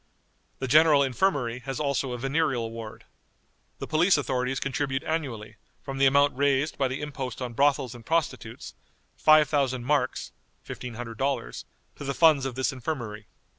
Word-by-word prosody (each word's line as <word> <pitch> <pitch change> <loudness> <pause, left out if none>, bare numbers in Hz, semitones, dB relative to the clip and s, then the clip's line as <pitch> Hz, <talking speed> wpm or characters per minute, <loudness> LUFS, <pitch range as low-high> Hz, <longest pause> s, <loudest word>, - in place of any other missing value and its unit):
The 130 - -4
General 150 +1 +6
Infirmary 130 -3 0
has 135 0 -5
also 140 -3 -1
a 125 - -3
venereal 135 -3 -1
ward. 115 -1 -8 0.7
The - - -5
police 165 +4 +3
authorities 130 -2 -1
contribute 135 0 -2
annually, 120 -10 -4 0.3
from 135 -1 -6
the 135 - +6
amount 140 +1 +4
raised 140 +2 +1
by 135 - +1
the 130 +3 -4
impost 135 -5 -5
on 125 -2 -5
brothels 135 -1 +2
and 120 -1 -12
prostitutes, 165 +5 -2 0.4
5000 145 -5 +3
marks 135 -2 0 0.3
($1500) 120 +1 -4 0.3
to - - -8
the 140 -1 -3
funds 155 -5 +4
of 130 - -6
this 130 +1 0
infirmary. 120 -6 -5
135 Hz, 145 wpm, -26 LUFS, 125-145 Hz, 0.7 s, General